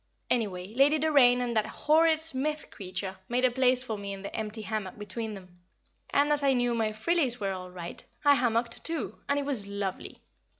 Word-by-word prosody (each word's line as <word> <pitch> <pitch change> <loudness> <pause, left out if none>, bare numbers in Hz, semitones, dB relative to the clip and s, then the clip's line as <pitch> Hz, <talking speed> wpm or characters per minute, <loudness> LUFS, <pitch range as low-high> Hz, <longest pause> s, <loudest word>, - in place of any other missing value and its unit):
Anyway, 200 -4 -1
Lady 280 +5 +4
Doraine 275 -5 +5
and 240 -1 -2
that 215 - +2
horrid 315 +1 +3
Smith 305 -1 -3
creature 190 0 -6
made 250 +1 +2
a 255 - +3
place 255 0 +3
for 220 -5 -4
me 200 0 -5
in 195 0 -8
the 200 - -6
empty 220 0 -3
hammock 215 -3 -4
between 210 +1 -5
them, 180 -2 -14 0.5
and, 290 +1 +2
as 295 -1 +3
I 275 -1 +3
knew 245 -1 +1
my 225 -2 +1
"frillies" 250 +3 +1
were 200 -2 -1
all 185 -1 -6
right, 175 -1 -5 0.2
I 285 - +8
hammocked 235 -2 0
too, 330 -1 -3
and 280 - +2
it 285 - -1
was 250 -8 0
lovely. 200 -2 -5
235 Hz, 200 wpm, -29 LUFS, 200-280 Hz, 0.5 s, I